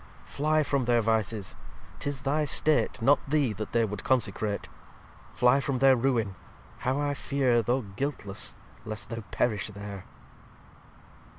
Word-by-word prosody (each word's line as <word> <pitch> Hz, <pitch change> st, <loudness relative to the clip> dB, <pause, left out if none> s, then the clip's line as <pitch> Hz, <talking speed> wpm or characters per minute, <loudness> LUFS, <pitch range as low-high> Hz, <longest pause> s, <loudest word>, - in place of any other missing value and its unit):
Fly 155 Hz, +1 st, +1 dB
from 140 Hz, -3 st, 0 dB
their 120 Hz, 0 st, +4 dB
Vices. 110 Hz, -2 st, 0 dB, 0.4 s
'Tis 140 Hz, -2 st, -3 dB
thy 150 Hz, +2 st, +1 dB
'state, 155 Hz, +2 st, +1 dB
Not 140 Hz, +5 st, +5 dB
Thee, 145 Hz, -6 st, +2 dB
that 105 Hz, +1 st, -6 dB
they 115 Hz, -1 st, +3 dB
would 105 Hz, -1 st, -5 dB
consecrate. 110 Hz, -4 st, 0 dB, 0.6 s
Fly 125 Hz, +3 st, +4 dB
from 140 Hz, -2 st, -1 dB
their 135 Hz, +1 st, +6 dB
Ruine. 115 Hz, -5 st, +1 dB, 0.5 s
How 130 Hz, +2 st, 0 dB
I 145 Hz, 0 st, 0 dB
fear 135 Hz, -4 st, +1 dB
Though 125 Hz, +3 st, 0 dB
guiltless 100 Hz, -1 st, -4 dB, 0.3 s
lest 110 Hz, 0 st, -6 dB
thou 115 Hz, 0 st, -3 dB
perish 105 Hz, -6 st, 0 dB
there." 100 Hz, -2 st, -8 dB
120 Hz, 135 wpm, -28 LUFS, 110-140 Hz, 0.6 s, their